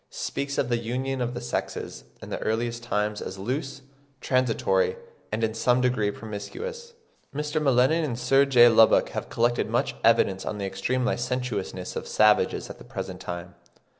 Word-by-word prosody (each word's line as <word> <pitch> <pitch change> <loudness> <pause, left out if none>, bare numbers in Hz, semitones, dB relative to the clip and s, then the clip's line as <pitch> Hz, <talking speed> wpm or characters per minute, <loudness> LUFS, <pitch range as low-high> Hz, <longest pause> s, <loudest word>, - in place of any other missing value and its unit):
163, - - -10
speaks 140 0 -3
of 125 - 0
the 120 -1 +1
union 130 +3 -2
of 120 0 -2
the - - -3
sexes 65 - -4 0.2
"in - - -9
the - - -3
earliest 115 +2 -1
times 105 -2 -1
as 95 - -6
loose, 135 +6 -4 0.4
transitory, 135 - +1 0.4
and 110 +2 -1
in 110 0 +1
some 125 +2 +2
degree 125 -5 +1
promiscuous." 440 - -7 0.4
Mr. 150 +1 -1
M'Lennan 135 +4 +3
and 125 -7 -2
Sir 135 +2 +4
J. 125 -3 +7
Lubbock 115 -1 +5
have - - -5
collected 120 +1 +1
much - - 0
evidence 95 -1 +3
on 105 - -4
the 100 - -3
extreme 95 +7 -1
licentiousness 120 -7 -2
of - - -4
savages 105 0 +3
at - - -10
the - - -11
present - - -6
time. 90 0 -6
120 Hz, 170 wpm, -26 LUFS, 110-135 Hz, 0.4 s, J